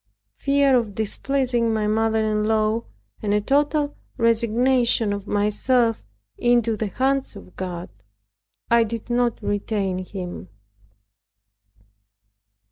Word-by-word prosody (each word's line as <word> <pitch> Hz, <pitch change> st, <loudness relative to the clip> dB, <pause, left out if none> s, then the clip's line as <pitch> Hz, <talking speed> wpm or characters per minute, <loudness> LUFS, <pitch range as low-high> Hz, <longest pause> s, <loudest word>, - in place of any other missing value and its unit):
Fear 280 Hz, -2 st, +3 dB
of 220 Hz, -5 st, -2 dB
displeasing 240 Hz, +1 st, 0 dB
my 215 Hz, -1 st, 0 dB
mother 220 Hz, +1 st, +1 dB
in 210 Hz, 0 st, 0 dB
law, 220 Hz, +1 st, +1 dB, 0.4 s
and 205 Hz, -1 st, 0 dB
a -, -, +3 dB
total 290 Hz, +5 st, +1 dB, 0.2 s
resignation 230 Hz, 0 st, +3 dB
of 200 Hz, 0 st, -6 dB
myself 225 Hz, +3 st, +1 dB, 0.4 s
into 240 Hz, -2 st, +2 dB
the 215 Hz, 0 st, -2 dB
hands 265 Hz, +4 st, -1 dB
of 195 Hz, -2 st, -13 dB
God, 180 Hz, -2 st, -5 dB, 0.8 s
I 235 Hz, 0 st, +6 dB
did 230 Hz, +1 st, -5 dB
not 240 Hz, -1 st, +1 dB
retain 200 Hz, -2 st, -1 dB
him. 180 Hz, -, -7 dB
225 Hz, 110 wpm, -23 LUFS, 210-245 Hz, 0.8 s, I